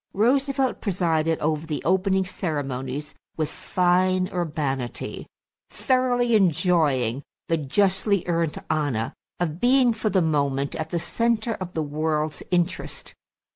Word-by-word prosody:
Roosevelt 265 Hz, +4 st, +1 dB
presided 165 Hz, -5 st, +1 dB
over 155 Hz, +1 st, -1 dB
the 150 Hz, -2 st, -3 dB
opening 190 Hz, +1 st, +2 dB
ceremonies 145 Hz, -5 st, -4 dB, 0.2 s
with 155 Hz, -2 st, -1 dB
fine 185 Hz, +1 st, +1 dB
urbanity, 145 Hz, -8 st, -3 dB, 0.4 s
thoroughly 250 Hz, -2 st, +1 dB
enjoying 160 Hz, -, +2 dB, 0.3 s
the 165 Hz, -, +2 dB
justly 190 Hz, +5 st, +1 dB
earned 165 Hz, -3 st, 0 dB
honor 145 Hz, -8 st, -1 dB, 0.3 s
of 170 Hz, -2 st, -2 dB
being 250 Hz, 0 st, +4 dB
for 220 Hz, -1 st, -1 dB
the 195 Hz, -, +2 dB
moment 140 Hz, -3 st, 0 dB
at 155 Hz, 0 st, -4 dB
the 170 Hz, -, -1 dB
center 230 Hz, +5 st, 0 dB
of 185 Hz, -3 st, -7 dB
the 160 Hz, -, 0 dB
world's 155 Hz, +1 st, -1 dB
interest. 175 Hz, -1 st, -1 dB
170 Hz, 120 wpm, -24 LUFS, 150-195 Hz, 0.4 s, being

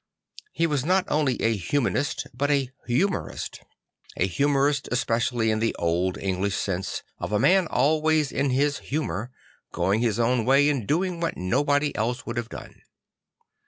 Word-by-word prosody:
He 165 Hz, -, +1 dB
was 145 Hz, -5 st, 0 dB
not 185 Hz, +4 st, +2 dB
only 145 Hz, -5 st, +1 dB
a 115 Hz, 0 st, +3 dB
humanist 140 Hz, +8 st, -1 dB
but 140 Hz, +4 st, -1 dB
a 135 Hz, -3 st, +1 dB, 0.2 s
humorist; 175 Hz, +11 st, -1 dB, 0.6 s
a -, -, +2 dB
humorist 140 Hz, -, +1 dB
especially 115 Hz, -1 st, +1 dB
in 110 Hz, -, 0 dB
the 115 Hz, +1 st, 0 dB
old 85 Hz, +2 st, 0 dB
English 95 Hz, +1 st, -1 dB
sense 95 Hz, -1 st, -3 dB, 0.2 s
of -, -, -4 dB
a 105 Hz, -, +2 dB
man 180 Hz, -, +4 dB
always 155 Hz, +1 st, +2 dB
in 140 Hz, +1 st, 0 dB
his 140 Hz, +3 st, +1 dB
humour, 120 Hz, -, -3 dB, 0.4 s
going 95 Hz, +4 st, +1 dB
his 115 Hz, -3 st, +1 dB
own 120 Hz, 0 st, +2 dB
way 135 Hz, +4 st, +4 dB
and 130 Hz, -9 st, -1 dB
doing 175 Hz, +2 st, 0 dB
what 165 Hz, -1 st, -2 dB
no 90 Hz, +10 st, +1 dB
bod 145 Hz, 0 st, +2 dB
y 145 Hz, -, 0 dB
else 120 Hz, +3 st, -2 dB
would 120 Hz, 0 st, -5 dB
have 120 Hz, -1 st, -3 dB
done. -, -, -10 dB
130 Hz, 165 wpm, -25 LUFS, 110-145 Hz, 0.6 s, man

